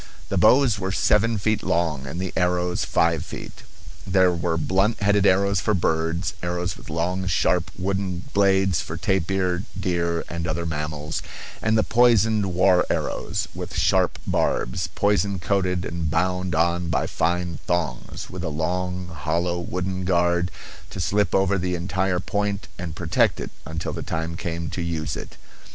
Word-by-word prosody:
The 100 Hz, -, 0 dB
bows 115 Hz, +2 st, +5 dB
were 95 Hz, -1 st, -2 dB
seven 110 Hz, +4 st, +3 dB
feet 110 Hz, +2 st, 0 dB
long 75 Hz, -6 st, 0 dB
and 85 Hz, +6 st, -5 dB
the 95 Hz, -1 st, -3 dB
arrows 90 Hz, 0 st, +1 dB
five 85 Hz, -1 st, +2 dB
feet. -, -, -9 dB, 0.5 s
There 95 Hz, -1 st, +4 dB
were 85 Hz, -1 st, -1 dB
blunt 95 Hz, +7 st, +1 dB
headed 100 Hz, -1 st, +3 dB
arrows 100 Hz, +1 st, +3 dB
for 105 Hz, +2 st, +1 dB
birds, 80 Hz, +2 st, 0 dB
arrows 90 Hz, -1 st, -2 dB
with -, -, -13 dB
long, 90 Hz, +4 st, -1 dB
sharp 90 Hz, -1 st, +2 dB
wooden 95 Hz, -1 st, -2 dB
blades 95 Hz, -3 st, +3 dB
for 80 Hz, -, -6 dB
tapir, 95 Hz, -1 st, 0 dB, 0.2 s
deer, 85 Hz, -3 st, 0 dB
and 85 Hz, 0 st, -4 dB
other 85 Hz, +2 st, -2 dB
mammals; 75 Hz, -1 st, -3 dB, 0.4 s
and 110 Hz, +1 st, +2 dB
the 110 Hz, -, +4 dB
poisoned 110 Hz, -4 st, +4 dB
war 90 Hz, 0 st, +4 dB
arrows, -, -, -1 dB
with -, -, -6 dB
sharp -, -, +2 dB
barbs, -, -, 0 dB
poison 100 Hz, -1 st, +2 dB
coated 90 Hz, -1 st, 0 dB
and 85 Hz, -2 st, -2 dB
bound 90 Hz, +2 st, 0 dB
on 85 Hz, +1 st, +1 dB
by 75 Hz, -4 st, +1 dB
fine 85 Hz, -2 st, -1 dB
thongs, 85 Hz, -3 st, -2 dB
and -, -, -16 dB
with 90 Hz, -1 st, -5 dB
a 80 Hz, -, -1 dB
long, 90 Hz, +3 st, -2 dB
hollow 85 Hz, +2 st, -1 dB
wooden 90 Hz, +2 st, -3 dB
guard 90 Hz, -1 st, +2 dB, 0.4 s
to -, -, -7 dB
slip 100 Hz, +4 st, +1 dB
over 95 Hz, 0 st, +3 dB
the 90 Hz, 0 st, -1 dB
entire 90 Hz, +1 st, 0 dB
point 100 Hz, -1 st, -2 dB
and 85 Hz, -3 st, -5 dB
protect 85 Hz, -1 st, +2 dB
it -, -, -5 dB, 0.2 s
until 80 Hz, +1 st, -4 dB
the -, -, -4 dB
time 80 Hz, +1 st, -3 dB
came 85 Hz, 0 st, -4 dB
to 90 Hz, -, -3 dB
use 80 Hz, -2 st, -2 dB
it. -, -, -8 dB
90 Hz, 160 wpm, -24 LUFS, 85-95 Hz, 0.5 s, bows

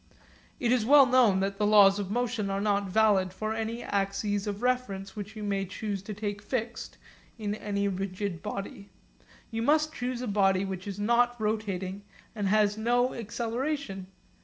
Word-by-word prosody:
It 240 Hz, -2 st, +1 dB
is 250 Hz, -3 st, +3 dB
well 280 Hz, +4 st, +7 dB
known 245 Hz, -7 st, +4 dB
that 195 Hz, +1 st, -2 dB
the 210 Hz, -, +2 dB
laws 205 Hz, -1 st, +6 dB
of 195 Hz, -2 st, -3 dB
motion 230 Hz, -2 st, -1 dB
are 195 Hz, 0 st, -1 dB
not 200 Hz, -1 st, 0 dB
valid 200 Hz, -2 st, +3 dB
for 215 Hz, +3 st, -3 dB
any 225 Hz, +1 st, -3 dB
axes 200 Hz, +1 st, -1 dB
of 205 Hz, +2 st, -4 dB
reference 235 Hz, -7 st, -1 dB
which 205 Hz, +1 st, -7 dB
you 215 Hz, -, -6 dB
may 200 Hz, -1 st, -1 dB
choose 200 Hz, +1 st, -4 dB
to 210 Hz, +2 st, -7 dB
take 205 Hz, -1 st, -4 dB
fixed 230 Hz, +1 st, -4 dB, 0.4 s
in 210 Hz, -2 st, -3 dB
any 200 Hz, -1 st, -2 dB
rigid 195 Hz, -1 st, -3 dB
body. 200 Hz, -1 st, -6 dB, 0.6 s
You 225 Hz, 0 st, -2 dB
must 305 Hz, +5 st, +2 dB
choose 250 Hz, -3 st, -3 dB
a -, -, -3 dB
body 195 Hz, -2 st, +2 dB
which 190 Hz, 0 st, -5 dB
is 200 Hz, -1 st, -5 dB
not 240 Hz, +3 st, +2 dB
rotating 200 Hz, -3 st, -2 dB, 0.3 s
and 205 Hz, -3 st, -2 dB
has 210 Hz, +1 st, +2 dB
no 245 Hz, +3 st, +2 dB
acceleration. 230 Hz, -2 st, -3 dB
210 Hz, 170 wpm, -28 LUFS, 195-235 Hz, 0.6 s, well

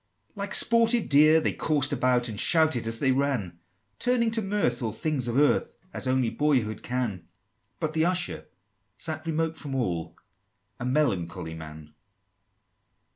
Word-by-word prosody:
III. -, -, -38 dB
Like 200 Hz, -1 st, -2 dB
sportive 230 Hz, 0 st, +4 dB
deer 155 Hz, +2 st, +6 dB
they -, -, -1 dB
coursed 145 Hz, -3 st, 0 dB
about, 125 Hz, -2 st, +1 dB
And 105 Hz, -3 st, -5 dB
shouted 155 Hz, -8 st, +3 dB
as 115 Hz, 0 st, -1 dB
they 130 Hz, +2 st, +1 dB
ran, 130 Hz, -11 st, -1 dB, 0.4 s
Turning 240 Hz, -2 st, +1 dB
to 225 Hz, 0 st, 0 dB
mirth 195 Hz, -, -1 dB
all 115 Hz, -2 st, -2 dB
things 130 Hz, +2 st, -2 dB
of 120 Hz, +2 st, -1 dB
earth, 145 Hz, +1 st, +2 dB, 0.2 s
As -, -, -2 dB
only 130 Hz, -3 st, +1 dB
boyhood 130 Hz, -8 st, 0 dB
can; 115 Hz, -9 st, -3 dB, 0.5 s
But 155 Hz, -2 st, -2 dB
the 160 Hz, +1 st, +1 dB
Usher 180 Hz, 0 st, -1 dB, 0.5 s
sat 155 Hz, 0 st, -4 dB
remote 160 Hz, 0 st, -1 dB
from 140 Hz, -3 st, -5 dB
all, 90 Hz, -10 st, -3 dB, 0.6 s
A 120 Hz, -, -4 dB
melancholy 95 Hz, -, -1 dB
man! 75 Hz, -1 st, -11 dB
135 Hz, 150 wpm, -26 LUFS, 115-160 Hz, 0.6 s, deer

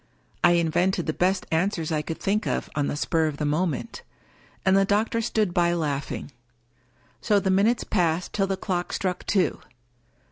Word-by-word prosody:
I 175 Hz, -, +6 dB
invented 175 Hz, +2 st, +1 dB
the 155 Hz, -, -1 dB
best 185 Hz, +3 st, +1 dB
answers 165 Hz, -1 st, 0 dB
I 155 Hz, -1 st, +1 dB
could 160 Hz, +1 st, -5 dB
think 210 Hz, +2 st, -1 dB
of -, -, -2 dB
on 145 Hz, -1 st, 0 dB
the -, -, -2 dB
spur 160 Hz, +1 st, +1 dB
of 150 Hz, -2 st, -4 dB
the 150 Hz, -, -2 dB
moment; 155 Hz, 0 st, -1 dB, 0.6 s
and 190 Hz, 0 st, +4 dB
the 195 Hz, -, +5 dB
doctor 215 Hz, +3 st, +1 dB
stood 215 Hz, -5 st, 0 dB
by 175 Hz, 0 st, +2 dB
laughing. 145 Hz, -3 st, -3 dB, 0.9 s
So 210 Hz, -3 st, +3 dB
the 190 Hz, -1 st, 0 dB
minutes 210 Hz, +5 st, +3 dB
passed 175 Hz, -3 st, 0 dB
till 195 Hz, -1 st, +1 dB
the 195 Hz, -1 st, -1 dB
clock 180 Hz, -3 st, -3 dB
struck 180 Hz, -2 st, -2 dB
two. 195 Hz, -3 st, +1 dB
180 Hz, 175 wpm, -25 LUFS, 160-195 Hz, 0.9 s, I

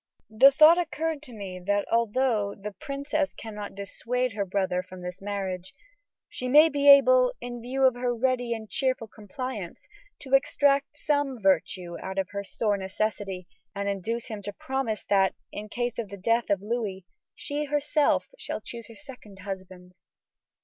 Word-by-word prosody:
The 250 Hz, +6 st, +8 dB
thought 310 Hz, +5 st, +7 dB
occurred 320 Hz, -2 st, -2 dB
to 290 Hz, -4 st, -12 dB
me 195 Hz, -5 st, -7 dB
that 205 Hz, +2 st, 0 dB
although 230 Hz, -2 st, +1 dB
the 210 Hz, +1 st, -7 dB
princess 285 Hz, +6 st, -3 dB
cannot 210 Hz, -3 st, -7 dB
dissuade 240 Hz, +5 st, -2 dB
her 200 Hz, -1 st, -1 dB
brother 185 Hz, -1 st, 0 dB
from 185 Hz, 0 st, -11 dB
this 180 Hz, +1 st, -7 dB
marriage, 190 Hz, -2 st, -4 dB, 0.5 s
she 255 Hz, -, -5 dB
may 300 Hz, +5 st, +7 dB
be 285 Hz, -1 st, +3 dB
able, -, -, +7 dB
in 240 Hz, -1 st, -6 dB
view 260 Hz, +3 st, -2 dB
of 260 Hz, -1 st, +6 dB
her 245 Hz, 0 st, -1 dB
ready 245 Hz, 0 st, 0 dB
and 220 Hz, -1 st, -8 dB
cheerful 255 Hz, 0 st, 0 dB
compliance, 215 Hz, -2 st, -7 dB, 0.3 s
to 270 Hz, -1 st, -7 dB
extract 280 Hz, +1 st, +3 dB
some 285 Hz, -4 st, 0 dB
virtue 185 Hz, -2 st, +1 dB
out 190 Hz, 0 st, -6 dB
of 190 Hz, -1 st, 0 dB
her 200 Hz, 0 st, -4 dB
sore 205 Hz, +1 st, -1 dB
necessity 195 Hz, -1 st, -3 dB, 0.3 s
and 200 Hz, 0 st, -2 dB
induce 220 Hz, +4 st, -2 dB
him 215 Hz, -2 st, -6 dB
to 205 Hz, +1 st, -5 dB
promise 265 Hz, -2 st, -3 dB
that, 195 Hz, -1 st, +3 dB, 0.2 s
in 210 Hz, 0 st, -7 dB
case 240 Hz, 0 st, -2 dB
of 220 Hz, -4 st, -4 dB
the 200 Hz, -, -8 dB
death 230 Hz, +4 st, +1 dB
of 200 Hz, -1 st, +1 dB
Louis, 210 Hz, -4 st, -3 dB, 0.3 s
she 295 Hz, 0 st, -3 dB
herself 295 Hz, +1 st, +1 dB
shall -, -, -4 dB
choose 230 Hz, +1 st, -9 dB
her 230 Hz, -, -13 dB
second 250 Hz, -9 st, -12 dB
husband." 185 Hz, -2 st, -8 dB
225 Hz, 165 wpm, -27 LUFS, 200-270 Hz, 0.5 s, The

